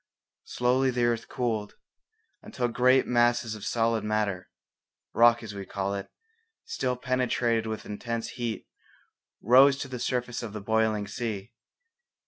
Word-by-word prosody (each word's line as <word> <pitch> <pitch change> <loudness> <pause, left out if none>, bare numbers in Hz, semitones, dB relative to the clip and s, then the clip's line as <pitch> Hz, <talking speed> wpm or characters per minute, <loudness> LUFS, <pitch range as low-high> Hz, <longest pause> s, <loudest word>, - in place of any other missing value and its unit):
Slowly 125 +2 +1
the 125 -1 0
earth 120 -1 0
cooled, 110 -4 -2 0.7
until 125 - -2
great 125 +2 +3
masses 120 -1 +2
of 105 -2 -9
solid 115 -2 0
matter, 105 -4 -1 0.6
rock 120 0 +5
as 105 -2 -7
we 100 -1 -6
call 100 0 -3
it, 100 -1 -5 0.6
still 130 - -2
penetrated 125 -3 0
with 110 0 -5
intense 115 +2 -4
heat, 120 -2 -5 0.8
rose 135 +5 +6
to 140 - -5
the 130 -2 -6
surface 125 0 -2
of 115 -4 -7
the 105 - -5
boiling 110 -1 +1
sea. 115 -1 -5
115 Hz, 135 wpm, -27 LUFS, 110-125 Hz, 0.8 s, rose